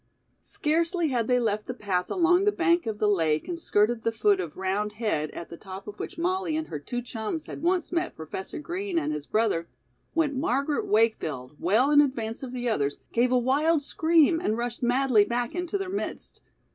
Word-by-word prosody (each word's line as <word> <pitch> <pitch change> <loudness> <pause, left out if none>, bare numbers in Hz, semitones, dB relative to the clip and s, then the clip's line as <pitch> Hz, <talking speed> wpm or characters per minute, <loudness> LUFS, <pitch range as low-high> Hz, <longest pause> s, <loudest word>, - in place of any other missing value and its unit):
Scarcely 330 +2 0
had 235 -4 0
they 250 -1 +3
left 215 -3 -1
the 250 - -4
path 185 -6 -1
along 355 +1 +3
the 415 - +4
bank 340 - +2
of 220 -2 -2
the 210 - +1
lake 160 -6 +1
and 345 -1 -4
skirted 225 -4 +2
the 230 - 0
foot 210 -3 +2
of 170 -4 -5
"Round 200 +3 -1
Head," 210 -9 -1
at 170 - -8
the 170 - -8
top 190 +1 -9
of 210 - -8
which - - -6
Molly 355 -1 0
and 315 - -4
her 150 - -4
two 245 - -4
chums 235 +6 -4
had - - -8
once 350 0 +1
met 345 0 -1
Professor 160 +4 -6
Green 355 +4 -3
and 320 - 0
his 150 -1 -5
brother, 210 -7 +1 0.5
when 295 -5 +1
Margaret 280 +1 0
Wakefield, 160 - +1
well 220 - +3
in 295 0 +7
advance 230 -6 -2
of 260 -2 -6
the 245 -1 -3
others, 145 -11 0 0.2
gave 245 +2 +3
a 255 - +4
wild 285 +5 +2
scream 325 +2 +3
and 225 -10 -1
rushed 240 0 -3
madly 245 -2 +4
back 240 +2 -2
into 355 +2 -2
their 390 -1 -4
midst. 390 +2 -5
245 Hz, 205 wpm, -27 LUFS, 210-325 Hz, 0.5 s, in